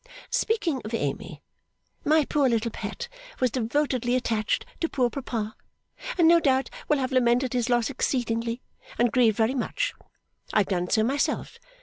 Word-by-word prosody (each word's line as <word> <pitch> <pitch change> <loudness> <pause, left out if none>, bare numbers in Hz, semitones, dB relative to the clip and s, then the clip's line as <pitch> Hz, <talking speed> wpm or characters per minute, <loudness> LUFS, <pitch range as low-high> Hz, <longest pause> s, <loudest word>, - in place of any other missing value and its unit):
Speaking 370 - 0
of 220 +2 -3
Amy; - - -4 0.6
my 310 0 +4
poor 280 -2 +2
little 230 0 0
pet 480 - -5 0.3
was 255 -2 +2
devotedly 250 0 0
attached 225 -3 0
to 330 - 0
poor 250 -3 +1
papa, 225 -5 -4 0.6
and 340 -2 +5
no 340 +1 +7
doubt 265 -5 +1 0.2
will 300 - +3
have 260 0 -1
lamented 250 0 +2
his 245 -1 0
loss 240 -2 +3
exceedingly, 235 -2 -1 0.3
and 240 -1 +3
grieved 225 -3 +4
very 225 +3 +2
much. - - -1 0.6
I 215 - +5
have 195 - -3
done 180 -2 0
so 220 - +3
myself. 275 +5 -1
250 Hz, 155 wpm, -26 LUFS, 230-275 Hz, 0.6 s, no